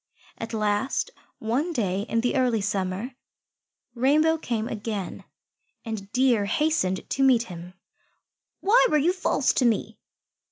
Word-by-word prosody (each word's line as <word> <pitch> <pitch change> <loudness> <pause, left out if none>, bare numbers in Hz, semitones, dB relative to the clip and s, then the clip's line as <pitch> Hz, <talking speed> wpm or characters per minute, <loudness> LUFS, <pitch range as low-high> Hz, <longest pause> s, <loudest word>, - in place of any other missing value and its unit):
At 225 - -5
last, 215 - 0 0.3
one 265 +10 -1
day 200 - -1
in 230 - +1
the 245 - 0
early 250 -4 +2
summer, 195 +4 -2 0.8
Rainbow 305 +6 +3
came 230 -6 -2
again, 210 -4 -5 0.6
and 210 -3 -6
Deer 250 -5 +3
hastened 200 -7 0
to 275 - -2
meet 255 -4 +5
him. 180 -2 -10 0.9
"Why 435 +6 +5
were 305 - +3
you 325 +5 +2
false 365 -7 +1
to - - +1
me?" 230 -3 0
230 Hz, 130 wpm, -25 LUFS, 205-270 Hz, 0.9 s, meet